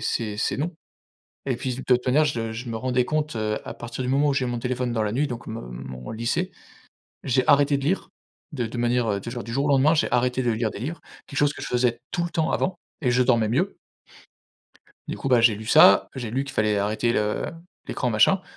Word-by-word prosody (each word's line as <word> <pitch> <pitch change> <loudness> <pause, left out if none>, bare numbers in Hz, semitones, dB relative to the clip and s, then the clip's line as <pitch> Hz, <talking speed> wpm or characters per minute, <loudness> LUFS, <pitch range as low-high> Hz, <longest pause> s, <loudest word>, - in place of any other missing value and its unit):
c'est 105 -1 -2
c'est - - 0
non. 160 +5 -2 0.7
Et 130 -3 0
puis 125 0 -3
de 130 - -6
toute 125 0 +2
manière, 150 +5 +4
je 115 -6 -2
je 120 +3 -6
me 115 - -3
rendais 125 +1 +1
compte, 155 -2 -1
heu, 110 -1 -1
à - - -5
partir 120 +2 -6
du - - -2
moment 140 +2 +3
où 140 - +2
j'ai 130 -2 0
mon 120 -1 -3
téléphone 125 -1 -2
dans 110 -2 0
la 105 - 0
nuit, 140 +6 +1
donc 120 -2 -7
mon 110 +1 -5
mon 65 - -7
lycée, 140 - -1 0.7
j'ai 130 0 +2
arrêté 145 -1 +5
de - - -6
lire 185 +5 0 0.4
de 125 -5 -2
de 120 +2 -6
manière 120 -4 +1
de 115 - -6
jour 120 0 -5
du 115 - -7
jour 140 +2 +1
au - - +1
lendemain, 140 +3 +5
j'ai 155 - +1
arrêté 125 +1 +1
de 120 - +2
lire 110 0 0
des - - -8
livres, 150 +9 -4 0.3
quelque 140 - -7
chose 145 0 +3
que - - -9
je - - -4
faisais 120 -1 +1
tout 175 - -1
le 170 - -2
temps 160 -1 0
avant 185 -2 -1 0.2
et 130 - +1
je 125 - +3
dormais 120 -4 +3
mieux. 115 - 0 1.3
Du - - -3
coup, 135 - -3
bah, 125 -2 +5
j'ai 115 -2 +5
lu 110 +2 -8
ça, 100 -2 +6
j'ai 120 -5 -5
lu 135 +3 -1
qu'il 135 - -8
fallait 105 -3 +1
arrêter 110 +4 0
le 105 0 0 0.4
l'écran 125 - -1
machin, 120 - +4
125 Hz, 240 wpm, -24 LUFS, 115-140 Hz, 1.3 s, ça